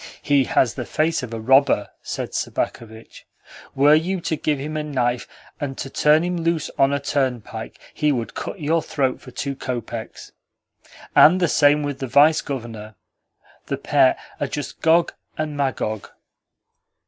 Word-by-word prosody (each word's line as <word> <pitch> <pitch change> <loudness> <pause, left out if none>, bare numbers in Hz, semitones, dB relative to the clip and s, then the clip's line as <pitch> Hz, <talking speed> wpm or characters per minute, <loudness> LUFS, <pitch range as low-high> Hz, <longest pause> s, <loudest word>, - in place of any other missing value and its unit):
"He 140 -2 +3
has 125 - +2
the 125 - -4
face 160 +6 0
of 125 -3 -7
a 115 - -4
robber," 130 -2 +3
said - - -5
Sobakevitch. 110 -1 -5 0.5
"Were 145 +2 +5
you 175 +5 +1
to 160 - -1
give 150 0 -1
him 150 +3 -5
a 155 - -1
knife, 125 -5 -1 0.3
and 135 -2 -4
to 135 - -6
turn 150 +2 +4
him 180 0 -1
loose 165 -2 -1
on 135 0 +4
a 140 - 0
turnpike, 125 -5 -3
he 150 -1 +1
would 120 -4 -3
cut - - -6
your 160 +2 +1
throat 135 -5 -1
for - - -12
two 140 -1 -4
kopecks. 120 -3 -6 0.8
And 180 +4 +7
the 175 - +3
same 145 0 +4
with 145 -2 -4
the 135 - -3
Vice 145 +5 +5
Governor. 115 -5 -7 0.7
The - - -2
pair - - +3 0.2
are - - -1
just - - -6
Gog 165 +1 +3 0.2
and 155 -1 -3
Magog." 115 -7 -2
140 Hz, 160 wpm, -22 LUFS, 125-155 Hz, 0.8 s, And